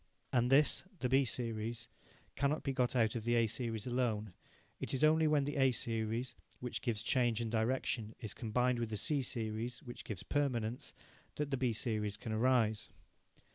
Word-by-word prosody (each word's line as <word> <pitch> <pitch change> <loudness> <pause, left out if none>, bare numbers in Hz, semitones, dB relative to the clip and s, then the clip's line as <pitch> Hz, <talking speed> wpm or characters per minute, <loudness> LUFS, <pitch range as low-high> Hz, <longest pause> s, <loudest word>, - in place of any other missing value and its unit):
And 125 0 +3
this 140 -2 +5
the 130 - 0
B 135 +1 +4
series 115 -1 -2 0.5
cannot 140 +3 +1
be 135 - -1
got 125 -2 +1
out 110 -3 +3
of 115 - -2
the 120 +1 +2
A 115 -1 +4
series 115 -1 -2
alone. 115 -5 -1 0.5
It - - -2
is 130 - 0
only 155 +1 +5
when 150 -2 +3
the 145 +1 -3
A 135 -1 +5
series, 115 +1 -2 0.3
which 125 -1 -4
gives 115 -4 -1
change 120 -1 +2
and 115 -2 -2
direction, 115 -1 0
is 105 -3 -5
combined 125 +2 +1
with 115 -2 -2
the 110 - -2
C 145 +7 +1
series, 115 0 -3
which 120 -1 -8
gives 100 -5 -6
permanence, 125 -5 -1 0.4
that 145 -1 -2
the - - +2
B 125 -2 +1
series 110 -3 -1
can 110 - -6
arise. 110 -1 +2
120 Hz, 180 wpm, -35 LUFS, 110-130 Hz, 0.5 s, this